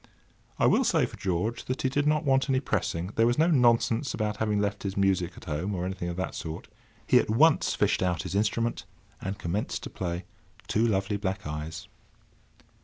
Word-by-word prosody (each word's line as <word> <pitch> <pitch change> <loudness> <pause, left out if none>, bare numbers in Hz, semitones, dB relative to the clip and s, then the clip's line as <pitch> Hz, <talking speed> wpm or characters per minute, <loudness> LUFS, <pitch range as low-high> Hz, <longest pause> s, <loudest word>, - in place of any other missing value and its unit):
I - - +2
will - - +4
say - - +3
for - - -9
George 100 +5 -2
that 130 - -3
he 130 - +2
did 145 +2 0
not 150 +1 +2
want 135 0 +2
any 130 -1 +3
pressing. 90 -8 -2
There 115 +1 +4
was 120 - +1
no 160 - +5
nonsense 120 -1 +3
about 105 -1 -2
having 105 -2 0
left 100 0 -1
his 100 -1 -4
music 95 -3 +1
at - - -12
home, 90 +5 -2
or 90 0 -2
anything 95 -2 -3
of 85 - -4
that 95 - -3
sort. 80 -1 -6 0.4
He - - +5
at - - -1
once 145 +8 +4
fished - - +1
out 90 -3 0
his 90 - -5
instrument, 110 +3 0 0.4
and 95 +1 -4
commenced 95 +3 -3
to - - -7
play 85 -1 -4 0.4
"Two 115 +2 +2
Lovely 100 -1 0
Black 95 -1 -3
Eyes." 75 +1 -5
100 Hz, 200 wpm, -28 LUFS, 90-120 Hz, 0.4 s, no